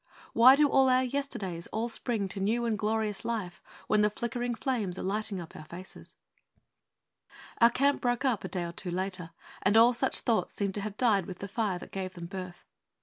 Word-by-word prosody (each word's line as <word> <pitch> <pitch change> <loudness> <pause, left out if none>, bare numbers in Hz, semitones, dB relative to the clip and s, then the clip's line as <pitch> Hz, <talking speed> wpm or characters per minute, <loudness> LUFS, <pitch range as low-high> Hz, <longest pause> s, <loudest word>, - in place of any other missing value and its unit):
Why 255 +3 +8
do 290 0 +3
our 260 -1 +5
yesterdays 235 -10 -3
all 225 +2 -2
spring 230 -3 -1
to 195 - -6
new 225 +5 +1
and 230 -2 +1
glorious 210 -1 -1
life 210 -7 -3 0.2
when 215 -1 +3
the 210 - +4
flickering 240 +2 -3
flames 220 -9 -2
are - - -4
lighting 205 0 -2
up 170 -2 -9
our 155 - -9
faces? 175 +4 -11 1.4
Our 235 -1 +7
camp 280 +4 +2
broke 245 +2 0
up 250 -5 +1
a - - -3
day 180 -3 -3
or 170 - -4
two 180 +2 -6
later; 185 -1 -3 0.3
and 200 +3 +3
all 235 +2 +7
such 260 +2 0
thoughts 230 -3 0
seemed 200 -2 -1
to 205 - -3
have 210 0 -5
died 205 -8 +2
with 185 - -7
the 200 - -6
fire 200 -2 -1
that - - -11
gave 185 -1 -5
them 170 -1 -7
birth. 185 -1 -8
210 Hz, 205 wpm, -29 LUFS, 190-240 Hz, 1.4 s, Why